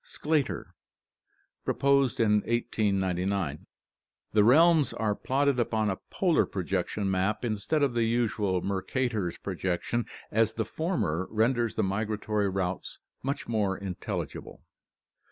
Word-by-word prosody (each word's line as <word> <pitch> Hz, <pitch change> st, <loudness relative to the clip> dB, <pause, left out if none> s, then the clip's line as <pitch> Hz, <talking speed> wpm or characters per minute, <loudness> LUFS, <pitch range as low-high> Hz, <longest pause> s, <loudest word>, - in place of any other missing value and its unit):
Sclater, 150 Hz, -3 st, -1 dB, 0.9 s
proposed 140 Hz, -2 st, +2 dB
in 105 Hz, -2 st, +4 dB
1899. 95 Hz, -7 st, 0 dB, 0.6 s
The 105 Hz, -1 st, +4 dB
realms 155 Hz, +5 st, +5 dB
are 110 Hz, -2 st, 0 dB
plotted 135 Hz, +4 st, +1 dB
upon 110 Hz, -3 st, +1 dB
a 95 Hz, -, -3 dB
polar -, -, +2 dB
projection 100 Hz, -2 st, -2 dB
map 95 Hz, +5 st, 0 dB
instead 120 Hz, +7 st, 0 dB
of 135 Hz, -3 st, +2 dB
the 120 Hz, -, +1 dB
usual 110 Hz, -5 st, +1 dB
Mercator's 100 Hz, -1 st, -1 dB
projection, 95 Hz, +5 st, -2 dB, 0.2 s
as 110 Hz, 0 st, +2 dB
the 110 Hz, -, -1 dB
former 100 Hz, -, -1 dB
renders 115 Hz, +1 st, +1 dB
the 110 Hz, -, +1 dB
migratory 105 Hz, +1 st, -1 dB
routes 95 Hz, -1 st, -3 dB, 0.2 s
much 140 Hz, +2 st, -3 dB
more 105 Hz, -4 st, 0 dB
intelligible. 95 Hz, -3 st, -5 dB
110 Hz, 115 wpm, -28 LUFS, 95-120 Hz, 0.9 s, realms